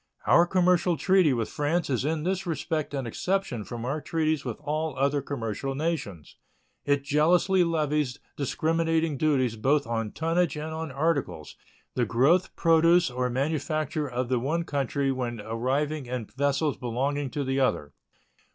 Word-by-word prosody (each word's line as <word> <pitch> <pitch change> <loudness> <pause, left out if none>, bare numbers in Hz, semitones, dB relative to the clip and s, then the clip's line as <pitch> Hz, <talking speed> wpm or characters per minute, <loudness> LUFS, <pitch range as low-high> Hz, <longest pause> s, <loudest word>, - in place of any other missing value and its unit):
Our 170 - +5
commercial 180 -1 +2
treaty 185 0 +4
with 115 -4 0
France 155 +4 0
is 130 -3 0
in 155 0 -1
this 185 +1 -1
respect 155 -2 -2
an 135 -2 -2
exception 165 - -2
from 120 +2 -6
our 145 +4 -2
treaties 155 -2 0
with 120 -4 -4
all 155 -1 -2
other 140 +1 +1
commercial 135 0 -4
nations. 140 - -4 0.5
It 145 -1 +1
jealously 170 +6 +3
levies 150 -5 0 0.2
discriminating 160 +2 0
duties 130 -6 +1
both 140 +6 +2
on 115 -2 -2
tonnage 165 -1 0
and 155 +1 -5
on 160 0 -4
articles 140 - -2 0.4
the 120 -3 0
growth, 140 - +2
produce, 165 -1 +4
or 125 0 -1
manufacture 150 +2 -1
of 125 0 -2
the 125 -1 +1
one 155 +7 -1
country 140 -2 -1
when 120 -3 -3
arriving 130 +6 -2
in 125 -2 -3
vessels 140 +4 0
belonging 135 +4 -2
to 145 +2 -3
the 135 0 -1
other. 75 - 0
145 Hz, 150 wpm, -27 LUFS, 125-160 Hz, 0.5 s, Our